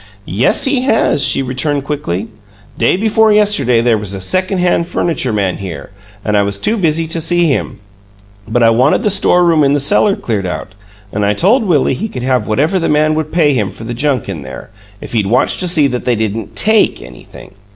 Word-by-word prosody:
"Yes, 110 +8 +2
he 265 -2 +1
has," 225 - +1
she 135 - +2
returned, 135 +3 -2
quickly. 115 - -4 0.5
"Day - - +1
before 220 +1 +2
yesterday 200 - +2
there 115 -2 +1
was 100 -1 -4
a - - -6
second 185 - 0
hand 175 -1 0
furniture 160 -8 -2
man 100 -4 -1
here, 90 -4 -8 0.3
and 105 - 0
I 100 - +3
was 100 0 -1
too 215 - 0
busy 165 -5 0
to 165 +1 -2
see 175 +2 +2
him, 140 -8 -2 0.7
but 115 +2 0
I 115 - +5
wanted 125 +6 +2
the 210 - +1
storeroom 175 -5 +3
in 140 0 +2
the 145 - +1
cellar 200 +7 +3
cleared 100 -5 -3
out, 90 - -6 0.4
and 105 - -1
I 100 +1 +1
told 220 +7 +2
Willie 150 -8 +1
he 215 - -4
could 125 -8 -7
have 130 -1 0
whatever 150 - 0
the 165 - -1
man 155 +1 +2
would 155 0 -3
pay 155 -4 +2
him 105 -7 -1
for - - -10
the 120 +2 -5
junk 130 -1 -1
in 80 - -6
there, 65 -1 -10 0.3
if - - -8
he'd 105 -4 0
watch 120 +5 +1
to 185 - +1
see 165 -4 +3
that 125 -1 -4
they 125 - 0
didn't 110 -1 -4
TAKE 220 0 +2
anything. - - -14
140 Hz, 215 wpm, -14 LUFS, 110-175 Hz, 0.7 s, I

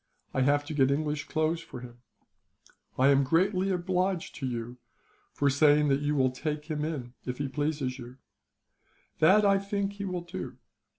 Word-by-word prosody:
I 130 - +1
have 145 +2 +2
to 155 - -5
get 135 -3 +3
English 150 +1 -1
clothes 160 +1 0
for 125 - -9
him. 120 -1 -11 1.0
"I 130 +2 +5
am 140 0 +5
greatly 185 +6 +2
obliged 185 0 -1
to 135 - -3
you 120 0 -5 0.5
for 145 - 0
saying 145 +1 +4
that 135 +1 +2
you 145 0 0
will 130 -2 +3
take 150 +3 -4
him, 150 -5 -4
if 125 0 -3
he 145 - -2
pleases 145 -2 -2
you. 125 +1 -10 1.0
That 195 +7 +6
I 195 -1 +4
think 200 0 -2
he 200 0 -5
will 180 -2 -3
do. 175 +2 -7
150 Hz, 170 wpm, -29 LUFS, 135-175 Hz, 1.0 s, That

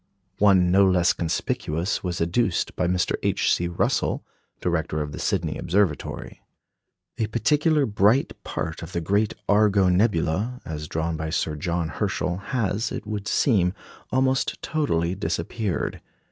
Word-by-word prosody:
One 95 -3 +5
no 95 +1 +5
less 90 -2 +3
conspicuous 85 +2 -2
was 90 -1 -2
adduced 85 +3 0
by 90 - 0
Mr. 90 0 +1
H. - - +2
C. 85 - 0
Russell, 85 - 0 0.3
director 80 -3 -1
of 75 -1 -3
the - - -7
Sydney - - -1
Observatory. 90 -5 -1 0.8
A 110 - +1
particularly 145 - +2
bright 105 +4 +3
part 80 0 -4
of 80 +2 -8
the 85 - 0
great 100 +5 +1
Argo 100 -2 +4
nebula, 100 +4 +1
as 75 -1 -5
drawn 80 +1 -2
by 80 0 -3
Sir 80 -1 -1
John 85 +2 -2
Herschel, 90 +4 -2
has, 105 0 -1
it - - -5
would 105 -1 -4
seem, 95 -8 +2 0.4
almost 130 +1 +1
totally 90 - 0
disappeared. 90 +3 -2
90 Hz, 140 wpm, -24 LUFS, 85-105 Hz, 0.8 s, One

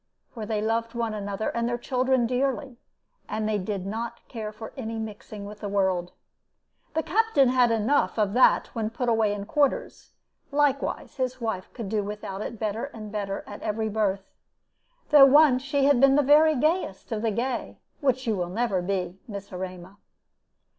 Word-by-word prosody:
For 220 -3 -7
they 215 -1 -1
loved 230 +1 -1
one 230 -2 -1
another 205 0 -3
and 235 0 -1
their 240 - -1
children 255 0 +1
dearly, 260 +1 -1 0.5
and 215 0 -2
they 215 -1 0
did 195 -1 -4
not 230 +3 -5
care 220 -3 -5
for 220 +1 -9
any 225 -4 -5
mixing 215 -1 -7
with 210 +1 -9
the 205 - -4
world. 190 -3 0 0.8
The 320 - +1
Captain 395 - +3
had 250 -1 +4
enough 230 +6 +1
of 205 -2 +1
that 255 - +4
when 220 -2 -2
put 240 +2 -2
away 220 -2 +2
in 205 -1 -4
quarters; 285 +4 -1 0.4
likewise 285 -1 0
his 255 -1 -2
wife 220 -6 -3
could 230 -5 -6
do 210 0 0
without 205 -1 -6
it 230 - -5
better 215 +2 -2
and 220 -7 -9
better 200 -2 -3
at 205 - -9
every 220 +1 -1
birth, 200 -2 -1 0.8
though 290 -2 +10
once 275 -2 +6
she 280 0 +1
had 280 -3 +4
been 275 0 +6
the 290 - +4
very 305 +3 +6
gayest 305 - -1
of 215 -2 -1
the 225 - +1
gay, 240 +4 -3 0.2
which 260 -3 +1
you 210 -6 0
never 220 +1 0
will 175 - -7
be, 185 -1 -2
Miss 200 -3 -8
Erema. 185 +1 -7
225 Hz, 180 wpm, -26 LUFS, 205-255 Hz, 0.8 s, though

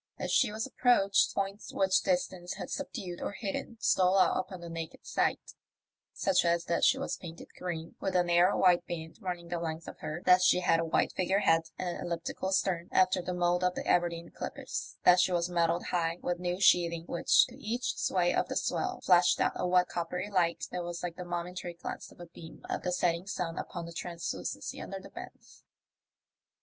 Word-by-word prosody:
As - - -3
she 245 -6 +3
was 220 +1 -3
approached, 200 -7 +3
points 195 +1 -3
which 190 -1 +2
distance 180 -1 -1
had - - -7
subdued 175 -2 -5
or - - -3
hidden 205 +3 -5
stole 185 -2 +3
out 190 - +4
upon 185 0 -5
the 170 - -7
naked 165 0 -7
sight; - - -1 0.6
such 190 -2 +2
as 170 0 +1
that 170 - 0
she 265 - +5
was 275 - -3
painted 170 -1 -10
green, 165 -2 -5
with 190 - -2
a 180 - +5
narrow 175 +2 +3
white 175 -2 +4
band 160 -2 -6
running 175 -2 -5
the 175 -1 -2
length 165 0 -4
of - - -9
her, 155 +3 -5
that 180 0 +6
she 180 0 +4
had 165 -2 +3
a 165 - 0
white 160 - +1
figure 190 +2 +1
head 165 -3 +3
and 180 - -3
an 175 - -5
elliptical 175 +2 -3
stem, 185 -3 0
after 185 0 +3
the 175 - -4
mould 175 0 +1
of 180 0 +1
the - - -4
Aberdeen 170 -1 +1
clippers; - - -6
that 180 0 +7
she 180 - +3
was 175 0 0
metalled 170 0 +1
high 165 -1 0
with 175 -1 -1
new 180 0 -2
sheathing, 170 -3 +4
which, 170 - +4
to 255 +2 -14
each 240 +3 -2
sway 175 -2 +1
of - - +1
the - - -4
swell, - - -1
flashed 180 -1 +4
out - - +2
a - - -1
wet 180 0 +4
coppery 180 +3 -4
light 175 -3 +1
that 180 - -3
was 175 0 -6
like 175 -2 -3
the 180 - -6
momentary 175 0 -5
glance 170 - -7
of - - -19
a 175 - -8
beam 165 -1 -13
of - - -2
the 180 - -2
setting 175 0 0
sun 170 -4 -3
upon 175 -2 -5
the 170 - -9
translucency 170 0 -5
under - - -6
the - - -13
bends. - - -12
175 Hz, 205 wpm, -30 LUFS, 170-185 Hz, 0.6 s, that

